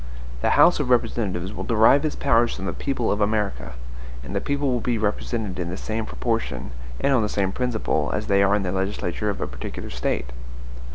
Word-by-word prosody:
The - - +2
House 175 - +6
of 140 -4 -1
Representatives 100 -6 0
will - - -5
derive 115 +5 +5
its 155 - -1
powers 120 -4 +3
from 95 - -6
the - - -2
people 135 -4 -1
of 105 - 0
America; 100 - 0 0.5
and 100 - -7
the 100 - +1
people 140 -1 0
will 120 -2 0
be 120 0 0
represented 105 -2 -2
in 85 -1 -2
the 90 - -4
same 110 0 -3
proportion, 115 - -2 0.3
and 140 - +2
on 125 - +4
the 105 - 0
same 95 -2 0
principle, 110 -12 -1
as 105 - -2
they 100 0 +3
are 100 +1 +4
in 105 - 0
the 90 - -1
legislature 95 +1 -2
of 100 - -3
a - - 0
particular - - -7
State. 65 - -2
105 Hz, 210 wpm, -24 LUFS, 95-120 Hz, 0.5 s, House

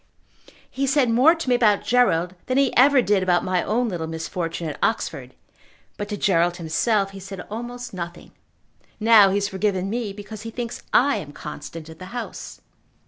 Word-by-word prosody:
He 275 +1 -2
said 270 -3 +3
more 265 +9 +5
to 330 -4 -6
me 250 - +3
about 215 -4 +3
Gerald 185 -8 +2
than 255 - 0
he 275 -2 +2
ever 265 0 +6
did 205 -2 +2
about 180 -1 +2
my 185 -1 0
own 240 +3 0
little 170 -6 -3
misfortune 165 +1 -4
at 150 - -6
Oxford; - - -2 0.6
but 205 0 -5
to 205 - -3
Gerald 175 -3 +2
himself 195 +5 0
he 195 - -10
said 195 -1 -8
almost 240 +2 -6
nothing. 175 -1 -7 0.7
Now 215 -2 +7
he 190 - 0
has 200 0 +1
forgiven 190 -1 -1
me 230 -3 -2
because 205 +1 -9
he 225 - -6
thinks 235 0 -5
I 280 +3 +4
am 145 -1 -7
constant 155 +2 -8
at 160 0 -12
the 185 - -8
House." 240 - -7
205 Hz, 185 wpm, -23 LUFS, 175-240 Hz, 0.7 s, Now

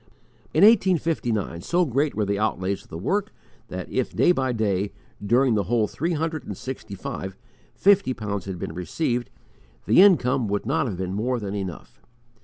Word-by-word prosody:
In 160 - +3
1859, 165 - +3
so 175 - +1
great 140 +2 0
were 105 - 0
the 100 0 -1
outlays 100 -2 -1
of - - -22
the 80 - -6
work 200 - -1 0.4
that - - -6
if - - -2
day - - +5
by 130 -6 0
day, 100 -4 -1 0.3
during 120 +4 +3
the 105 -3 +1
whole 110 +1 +1
three 170 +10 -2
hundred 160 0 -2
and - - -7
sixty 130 -6 -7
five, 95 0 -6 0.4
fifty 200 -7 +4
pounds 100 -4 -4
had 95 -2 -5
been 80 - -5
received, 120 - -2 0.6
the - - +6
income 135 - +4
would 100 +1 -2
not 135 +3 +1
have 100 -6 -4
been 95 0 -3
more 120 +5 -1
than 100 -2 -5
enough. 95 -4 -6
115 Hz, 180 wpm, -24 LUFS, 100-155 Hz, 0.6 s, the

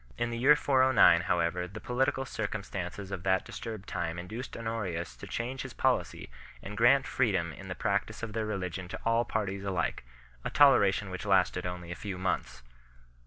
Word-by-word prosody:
In 120 - -1
the 115 - -3
year 145 +5 +7
409 130 -11 +5
however 90 +1 +1
the 100 +4 -9
political 135 +3 0
circumstances 100 -4 -5
of 95 - -4
that 95 0 +1
disturbed 110 -3 -7
time 85 -2 -3
induced 110 +9 -6
Honorius 105 -7 -3
to - - -9
change 125 +3 -3
his - - -7
policy, - - 0 0.3
and 105 +2 -7
grant 125 +5 +5
freedom 95 -10 0
in 100 - -10
the 90 - -4
practice 105 +2 -1
of 110 -2 -4
their 110 -1 -2
religion 90 -3 -4
to - - -6
all 115 +1 +3
parties 100 -3 -2
alike 95 -3 -1 0.4
a - - -2
toleration 105 -9 +4
which 95 - -5
lasted 90 -2 +2
only 90 -1 -6
a - - -4
few 100 -1 -5
months. 90 -8 -2
100 Hz, 175 wpm, -30 LUFS, 90-115 Hz, 0.4 s, year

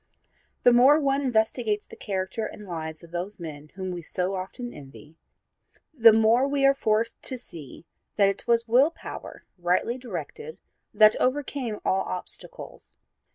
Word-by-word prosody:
The 245 - +6
more 265 +5 +6
one 275 -1 +1
investigates 220 -3 0
the - - -13
character 190 +2 -3
and 210 - -11
lives 160 -2 -6
of 170 - -14
those 180 +4 -5
men 150 -3 -8
whom 190 -1 -4
we 175 -1 -5
so 180 +3 -2
often 200 +6 -6
envy, 150 +2 -13 0.8
the 230 -6 +7
more 225 +4 +4
we 280 -1 +1
are 275 - +6
forced 225 -3 0
to 260 - -3
see 165 - -12 0.3
that 200 -2 +4
it 195 - -3
was 235 0 +2
will 255 +6 +5
power 335 - -10
rightly 180 +8 0
directed 255 - -7 0.3
that 215 0 +6
overcame 255 -4 -1
all 190 - +2
obstacles. 180 -1 -8
220 Hz, 155 wpm, -26 LUFS, 180-250 Hz, 0.8 s, the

